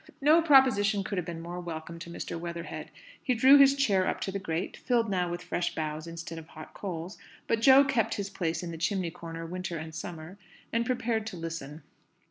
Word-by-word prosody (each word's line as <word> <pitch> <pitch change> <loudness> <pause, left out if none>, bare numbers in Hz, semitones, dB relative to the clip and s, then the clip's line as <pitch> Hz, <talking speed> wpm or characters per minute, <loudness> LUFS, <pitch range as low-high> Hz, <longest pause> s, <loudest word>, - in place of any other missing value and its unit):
No 305 +4 +5
proposition 235 -10 +5
could 195 -1 -2
have 175 - -4
been 165 -1 -6
more 175 +1 -6
welcome 170 -1 -6
to 170 - -8
Mr. 170 - -5
Weatherhead. 170 0 -6 0.3
He 250 - 0
drew 265 +4 +7
his 275 0 +7
chair 200 -9 +2
up - - -1
to 195 - -2
the 200 - -3
grate 170 0 -3
filled 235 -4 0
now 180 -2 0
with 175 +1 -5
fresh 175 0 -2
boughs 155 0 -3
instead 165 0 -7
of 160 - -12
hot 155 -1 -11
coals; 180 -1 -6 0.3
but 225 -1 0
Jo 265 +3 +8
kept 270 -6 +1
his 200 -1 -4
place 170 -3 -2
in 170 - -4
the 165 - -7
chimney 175 0 0
corner 165 -1 -7
winter 180 0 -4
and 160 +1 -7
summer 160 +3 -7 0.3
and 230 +1 +1
prepared 230 -3 -1
to 185 - -6
listen. 165 -2 -6
180 Hz, 210 wpm, -29 LUFS, 165-225 Hz, 0.3 s, Jo